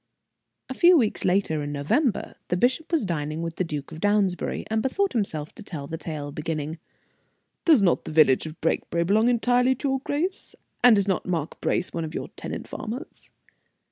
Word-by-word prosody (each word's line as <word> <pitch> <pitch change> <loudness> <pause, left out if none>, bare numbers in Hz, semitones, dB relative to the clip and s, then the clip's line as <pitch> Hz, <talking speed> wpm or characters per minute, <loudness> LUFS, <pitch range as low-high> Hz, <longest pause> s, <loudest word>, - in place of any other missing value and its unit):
A 260 - -4
few 345 +5 +6
weeks 225 -7 0
later, 180 -5 +1
in 145 0 -4
November, 195 - 0
the 180 - 0
bishop 255 - +1
was 320 -10 +2
dining 155 -2 -2
with 165 -1 -5
the - - +1
Duke 150 -4 -5
of 160 - -8
Downsbury, 205 -2 +1
and 220 0 0
bethought 385 - 0
himself 165 -10 -2
to 235 - -11
tell 160 -9 -6
the 160 +3 -5
tale, 150 -2 -5
beginning: 155 +1 -4 0.9
"Does 310 - +6
not 175 - +2
the - - -5
village 155 -2 +4
of 155 +1 -10
Brakebury 170 +1 0
belong 210 +6 +3
entirely 245 +2 +3
to 280 - -2
your 270 0 +1
grace? 320 +8 -3 0.3
and 245 -3 +8
is 200 0 +1
not 190 -2 0
Mark 165 -4 -3
Brace 180 - 0
one 165 - -2
of 160 0 -6
your - - -4
tenant - - -7
farmers?" 245 +8 -6
185 Hz, 190 wpm, -25 LUFS, 155-245 Hz, 0.9 s, and